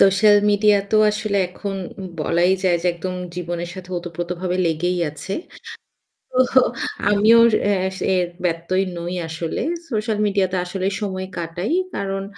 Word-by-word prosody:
Social 195 +2 +6
মিডিয়াতেও 205 0 +3
আসলে 210 -1 -2
এখন 195 +2 -5 0.4
বলাই 175 +4 +2
যায় 180 -2 +3
যে - - 0
একদম 180 +2 -4 0.2
জীবনের 175 -1 -4
সাথে 185 -1 -10
ওতপ্রোতভাবে 175 +1 -4
লেগেই 175 +3 0
আছে। 175 +6 -6 1.2
তো 260 - +7 0.5
আমিও 215 +3 +6 0.3
এ - - +3 0.4
এর 180 - +2 0.2
ব্যত্যয় 175 +3 0
নই 170 +1 -4
আসলে। 160 0 -3 0.3
সোশ্যাল 215 -1 -1
মিডিয়াতে 195 -2 +1
আসলে 185 +1 -2
সময় 190 -2 -3
কাটাই। 170 - -3 0.2
কারণ 195 0 -2
185 Hz, 125 wpm, -21 LUFS, 175-200 Hz, 1.2 s, তো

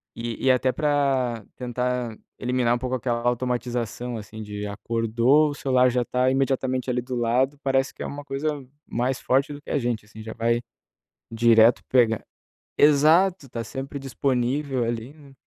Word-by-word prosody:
E 115 +1 -5
e - - +7
até 130 0 +2
pra 135 -7 0
tentar 125 -2 -2 0.2
eliminar 125 -1 +1
um - - -1
pouco 130 +1 -2
aquela 120 -1 -1
automatização, 120 -1 -2
assim, 110 +1 -9
de, 105 -1 -6
acordou, 115 +7 +2
o - - -6
celular 130 -2 +3
já 125 0 +1
tá 125 +1 +1
imediatamente, 130 -1 0
ali, 125 0 0
do 125 +1 -5
lado, 125 +4 +1
parece 135 0 +1
que - - -7
é - - -4
uma 145 0 -6
coisa 140 +2 -3 0.4
mais 125 +2 -1
forte 135 +3 +1
do 145 - -9
que - - -13
a 145 - +1
gente, 120 -4 -2
assim, 110 +1 -12
já 110 0 -7
vai 115 +1 0 0.7
direto 115 0 +5
pegar 115 -4 +3 0.5
exato, 155 +3 +4
tá 115 -1 -4
sempre 135 +5 -6
disponível, 135 0 -1
ali, 115 +3 -4
né. 140 -3 -17
125 Hz, 165 wpm, -24 LUFS, 115-135 Hz, 0.7 s, e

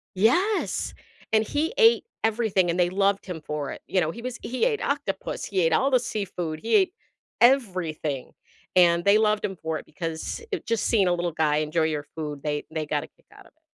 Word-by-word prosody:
Yes, 350 - +1 0.4
and 220 0 +5
he 315 +7 -1
ate 465 -1 +5 0.2
everything, 215 -5 +2
and 170 +2 -1
they 175 0 +3
loved 195 +1 +1
him 180 -4 -6
for 150 -2 -3
it, - - -8
you 185 - +1
know, 160 -1 0
he 235 - -9
was 250 0 -5
he 255 - 0
ate 450 -4 0
octopus, 280 -8 -2
he 190 -2 0
ate 165 -1 +3
all 270 +12 +3
the 255 - +5
seafood, 180 -8 -4
he 230 - +1
ate 380 -3 +4 0.5
everything, 180 - +1 0.4
and 170 -1 +5
they 200 +1 +6
loved 215 -1 +2
him 195 - -4
for 160 -2 -3
it - - -13
because 165 - -5
it 400 - -3
just 230 -1 0
seeing 205 -5 +3
a 175 - +3
little 175 0 -1
guy 155 -2 +1
enjoy 155 +2 0
your 150 -2 -1
food, 150 -3 -5
they 150 -1 -2
they 155 -1 -2
got - - -1
a - - -10
kick - - -34
out - - -16
of - - -20
it. - - -40
185 Hz, 220 wpm, -25 LUFS, 160-235 Hz, 0.5 s, they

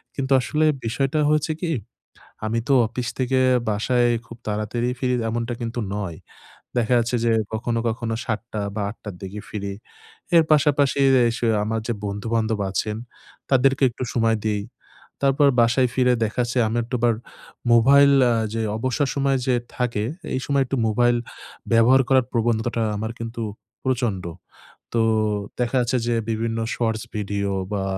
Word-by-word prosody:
কিন্তু 135 -1 -3
আসলে 150 +6 0 0.2
বিষয়টা 135 +6 0
হচ্ছে 155 +1 +1
কি, 170 - -1 0.8
আমি 115 +2 0
তো - - +3
অফিস 120 +2 -4
থেকে 130 0 +1 0.3
বাসায় 120 +4 +2 0.2
খুব 115 - -10
তাড়াতাড়ি 105 +3 -2
ফিরি 125 0 0 0.2
এমনটা 115 +1 -2
কিন্তু 115 0 -4 0.2
নয়। 95 -6 -4 0.6
দেখা 120 +1 +2
যাচ্ছে 120 +1 0
যে 115 - +3 0.2
কখনো, 115 +1 -1
কখনো 115 0 -3
৭ঃ০০ 110 -1 -3
বা 110 - -2
৮ঃ০০ 105 -3 -9
দিকে 95 +2 -6
ফিরি। 100 -2 -4 0.6
এর 165 - +7
পাশাপাশি 145 -2 +3 0.2
এ - - +4
সে 120 - 0 0.2
আমার 110 +1 -1
যে 120 - 0
বন্ধু-বান্ধব 110 +2 -1
আছেন, 105 +2 -2 0.5
তাদেরকে 135 +1 +3
একটু 125 - -6
সময় 115 -2 +2
দেই। 105 -2 0 0.6
তারপর 140 +1 +4
বাসায় 120 +2 +3
ফিরে 125 -1 +4
দেখা 110 +3 -1
যাচ্ছে 120 +1 -1
আমি 115 - -1
একটু 120 +3 -4
আবার 120 -1 +4 0.6
মোবাইল 140 +4 +6 0.2
আ - - +3 0.2
যে 115 - -1 0.2
অবসর 130 +4 0
সময় 140 -1 +2
যে 125 - +3 0.2
থাকে, 115 -4 -1 0.3
এই - - 0
সময় 140 -1 +2
একটু 135 +2 -2
মোবাইল 120 +2 +3 0.6
ব্যবহার 120 +4 +6
করার 130 -2 +4
প্রবনতাটা 115 0 0
আমার 110 +2 -3
কিন্তু 115 0 -5 0.4
প্রচন্ড। 120 -8 -1 0.7
তো 115 - +3 0.6
দেখা 125 +2 0
যাচ্ছে 125 +1 +1
যে 120 - +2 0.2
বিভিন্ন 115 +1 -1 0.2
শর্টস 110 -2 -1
ভিডিও 100 -1 -2 0.2
বা 100 -2 -1
120 Hz, 150 wpm, -23 LUFS, 110-130 Hz, 0.8 s, এর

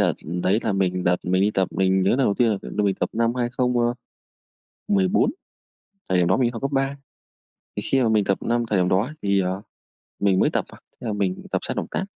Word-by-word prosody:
đợt - - +3 0.3
đấy 95 +4 +3
là 110 - 0
mình 90 -2 0
đợt 90 0 +3
mình 95 +1 +2
đi 105 - +3
tập, 95 -3 0
mình 95 0 +2
nhớ 95 - +3
lần 130 - +2
đầu 105 -7 +2
tiên 120 -2 +3
là 105 - 0
là 105 - -2
mình 100 -1 +2
tập - - -2
năm 115 +1 +1
2014. 125 - -1 0.8
Thời 95 -1 +2
điểm 85 -1 +3
đó 95 - +3
mình 125 - +2
đi - - +1
học 115 - -7
cấp 140 - -2
3, 135 +1 0 0.8
thì - - -2
khi 135 -1 +1
mà 115 - +2
mình 105 -2 +3
tập 95 - +1
năm 120 0 0
thời 100 -4 +1
điểm 90 - +2
đó 105 +9 +1
thì, 100 -1 +2
ờ, 95 +1 -1 0.6
mình 95 -2 +3
mới - - +4
tập - - -1
à, - - -14
thế 120 - -9
là 105 - -1
mình 95 -3 -2
tập - - +1
sai - - -3
động - - -3
tác, 190 - -1
105 Hz, 240 wpm, -23 LUFS, 95-120 Hz, 0.8 s, mới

